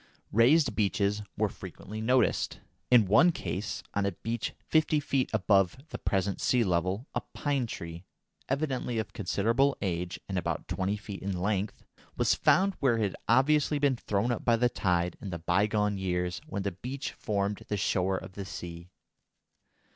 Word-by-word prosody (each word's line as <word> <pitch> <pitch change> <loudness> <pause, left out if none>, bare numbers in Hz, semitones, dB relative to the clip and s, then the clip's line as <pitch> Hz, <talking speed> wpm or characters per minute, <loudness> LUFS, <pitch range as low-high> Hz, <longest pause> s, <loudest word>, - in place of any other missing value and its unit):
Raised 130 +6 +4
beaches 105 0 +1 0.2
were 105 0 +2
frequently 100 +3 -8
noticed. 125 +3 +2 0.3
In 120 -4 +7
one 140 - +6
case, 105 - -4
on 100 - +1
a 100 - -1
beach 115 +5 -3
fifty 155 -1 +3
feet 135 -2 0
above 100 -2 +3
the - - -6
present 95 -1 -1
sea 125 -2 +3
level, 95 +4 0
a - - -1
pine 140 -4 0
tree, 85 -4 -7 0.5
evidently 135 -4 -1
of 110 - -3
considerable 115 +8 +1
age 90 -1 -2
and 95 -2 -1
about - - -3
twenty 95 +2 -1
feet 100 -1 -8
in 95 -2 -3
length, 100 +1 -1 0.3
was - - +3
found 195 +1 +3
where 125 -5 +3
it 110 - +1
had - - -9
obviously 145 +5 +3
been 140 -2 +2
thrown 105 0 -1
up 120 - -2
by 115 - +4
the 120 +1 +2
tide 90 -5 0
in 100 - -5
the 85 - -3
bygone 100 +4 +1
years 90 -1 -1
when 100 -10 -3
the 100 - -1
beach 130 +9 -5
formed 100 -1 -2
the 105 - -1
shore 95 -1 +1
of - - -8
the 100 +1 -7
sea. 85 -1 -8
105 Hz, 170 wpm, -29 LUFS, 95-125 Hz, 0.5 s, In